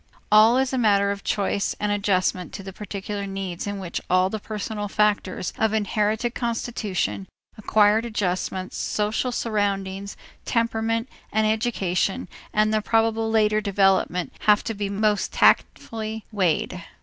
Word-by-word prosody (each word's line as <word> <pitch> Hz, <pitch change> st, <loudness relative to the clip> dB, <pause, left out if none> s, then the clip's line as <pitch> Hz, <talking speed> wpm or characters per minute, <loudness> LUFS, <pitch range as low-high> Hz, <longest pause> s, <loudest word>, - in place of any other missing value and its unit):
All 220 Hz, +3 st, +7 dB
is 265 Hz, 0 st, +1 dB
a 260 Hz, -, +1 dB
matter 200 Hz, -3 st, +3 dB
of 200 Hz, 0 st, -5 dB
choice 200 Hz, -1 st, 0 dB
and 210 Hz, 0 st, 0 dB
adjustment 185 Hz, -3 st, 0 dB
to 195 Hz, -, -7 dB
the 195 Hz, 0 st, -8 dB
particular 200 Hz, 0 st, -5 dB
needs 195 Hz, -2 st, -5 dB
in 205 Hz, 0 st, -3 dB
which 185 Hz, -3 st, -4 dB
all 185 Hz, +1 st, +3 dB
the 220 Hz, -, -3 dB
personal 210 Hz, 0 st, -4 dB
factors 205 Hz, -3 st, 0 dB
of 220 Hz, -1 st, +2 dB
inherited 215 Hz, +2 st, 0 dB
constitution, 215 Hz, -, -2 dB, 0.3 s
acquired 215 Hz, +1 st, +3 dB
adjustments, 185 Hz, -4 st, -2 dB
social 215 Hz, +4 st, -1 dB
surroundings, 200 Hz, -4 st, -2 dB, 0.3 s
temperament, 230 Hz, 0 st, 0 dB, 0.2 s
and 220 Hz, 0 st, +2 dB
education, 215 Hz, -1 st, 0 dB, 0.2 s
and 215 Hz, 0 st, +2 dB
the 215 Hz, -, +2 dB
probable 225 Hz, 0 st, +1 dB
later 215 Hz, -1 st, +3 dB
development 195 Hz, -3 st, +1 dB
have 210 Hz, 0 st, +5 dB
to 225 Hz, -, -3 dB
be 200 Hz, -1 st, -3 dB
most 210 Hz, 0 st, +1 dB
tactfully 220 Hz, -1 st, +1 dB
weighed. 185 Hz, -1 st, 0 dB
210 Hz, 135 wpm, -24 LUFS, 195-220 Hz, 0.3 s, All